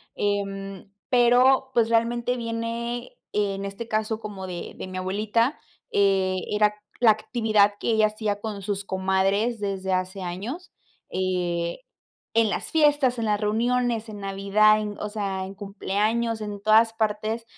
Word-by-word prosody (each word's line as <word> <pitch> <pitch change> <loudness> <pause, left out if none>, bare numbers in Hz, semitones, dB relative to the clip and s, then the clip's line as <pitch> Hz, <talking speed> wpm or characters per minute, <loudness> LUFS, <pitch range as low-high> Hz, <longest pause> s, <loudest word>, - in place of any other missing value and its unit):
Em, 195 -1 -3 0.2
pero, 255 +2 +4
pues, 230 -1 +3
realmente 235 +2 +1
viene, 235 +1 -4 0.2
en 200 -1 -1
este 200 +4 -6
caso, 220 0 -1
como 200 -3 -7
de 175 -2 -6
de - - -6
mi 185 0 -6
abuelita, 215 +8 0 0.3
eh, 190 -2 +2
era 210 0 +3 0.2
la 230 -3 +7
actividad 215 -2 +2
que - - 0
ella 215 -1 +4
hacía 210 -1 -2
con 210 -3 -5
sus 200 0 -3
comadres 195 +4 +1
desde 190 -2 -2
hace 185 +1 -2
años, 210 - -5 0.4
eh, 175 -1 -1 0.6
en 225 -2 +4
las - - -3
fiestas, 290 -5 +3
en 225 - -1
las 210 0 +1
reuniones, 230 +1 0
en 205 -1 -8
navidad, 200 +2 +3
en 210 -1 -4
o 210 - -3
sea, 195 -3 -3
en 195 - -9
cumpleaños, 215 +3 -1
en 205 -1 -5
todas 225 +1 +5
partes 220 +1 -1
210 Hz, 145 wpm, -25 LUFS, 195-230 Hz, 0.6 s, la